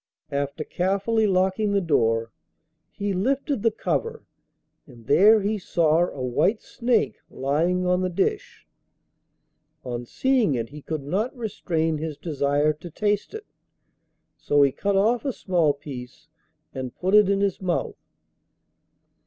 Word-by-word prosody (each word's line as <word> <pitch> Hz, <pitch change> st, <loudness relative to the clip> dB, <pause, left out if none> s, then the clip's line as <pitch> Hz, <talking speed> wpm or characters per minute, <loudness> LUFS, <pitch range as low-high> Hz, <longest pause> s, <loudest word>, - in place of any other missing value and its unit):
After 140 Hz, +2 st, -2 dB
carefully 200 Hz, +6 st, 0 dB
locking 190 Hz, +2 st, +1 dB
the 200 Hz, -, +3 dB
door, 115 Hz, -9 st, +1 dB, 0.6 s
he 200 Hz, -1 st, -3 dB
lifted 265 Hz, +6 st, 0 dB
the 230 Hz, -, +4 dB
cover, 460 Hz, -, -3 dB, 0.6 s
and 120 Hz, -5 st, -16 dB
there 205 Hz, -, +6 dB
he 210 Hz, +2 st, -1 dB
saw 170 Hz, -1 st, +2 dB
a 130 Hz, -, -6 dB
white 190 Hz, -, +1 dB
snake 240 Hz, 0 st, 0 dB
lying 165 Hz, +7 st, 0 dB
on 180 Hz, 0 st, +2 dB
the 185 Hz, -, 0 dB
dish. 440 Hz, -, -2 dB, 1.2 s
On 120 Hz, -1 st, -5 dB
seeing 250 Hz, -, +1 dB
it 115 Hz, -1 st, -3 dB
he 150 Hz, +2 st, -10 dB
could 155 Hz, -1 st, -4 dB
not 210 Hz, -, -2 dB
restrain 165 Hz, -8 st, -2 dB
his 155 Hz, -2 st, -5 dB
desire 145 Hz, -1 st, 0 dB
to 165 Hz, +4 st, -11 dB
taste 205 Hz, -, -1 dB
it, 435 Hz, 0 st, -7 dB, 0.9 s
so 145 Hz, -1 st, +3 dB
he 140 Hz, -, +3 dB
cut 200 Hz, +8 st, -1 dB
off 225 Hz, +5 st, +2 dB
a 280 Hz, -, -1 dB
small 175 Hz, -, +1 dB
piece 140 Hz, +1 st, -10 dB, 0.4 s
and 130 Hz, -2 st, -6 dB
put 185 Hz, +2 st, -1 dB
it 210 Hz, -2 st, +6 dB
in 200 Hz, 0 st, +2 dB
his 200 Hz, -2 st, 0 dB
mouth. 180 Hz, -2 st, -2 dB
180 Hz, 140 wpm, -24 LUFS, 145-210 Hz, 1.2 s, there